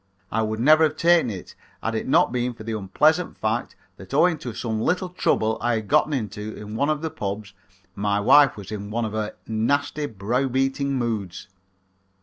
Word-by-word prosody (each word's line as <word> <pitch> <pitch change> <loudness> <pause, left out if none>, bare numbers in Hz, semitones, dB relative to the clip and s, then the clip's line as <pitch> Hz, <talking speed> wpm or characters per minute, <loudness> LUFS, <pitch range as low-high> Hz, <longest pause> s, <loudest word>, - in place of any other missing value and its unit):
I 110 - +1
would 110 0 -2
never 155 +6 +6
have 155 0 -2
taken 170 -5 +4
it 95 -4 -8 0.3
had - - -1
it - - -3
not - - +4
been 125 0 -1
for 110 - -10
the 110 0 -3
unpleasant 150 - +1
fact 110 +2 -2 0.2
that - - -8
owing 175 -3 +4
to 125 - -5
some 110 -1 -3
little 180 +7 0
trouble 110 -10 0
I 120 0 +1
had 110 -2 -4
gotten 155 - +3
into 110 -5 -4
at 105 - -9
one 125 +7 0
of 155 0 -1
the 160 - -2
pubs 100 0 -5 0.4
my 100 +1 0
wife 135 +3 +5
was 100 0 -9
in 100 -1 -5
one 115 +2 -1
of 110 - -5
her 110 -1 -3
nasty, 145 +6 0
brow 115 +5 -1
beating 135 +2 0
moods. 110 -7 -3
115 Hz, 195 wpm, -24 LUFS, 110-145 Hz, 0.4 s, never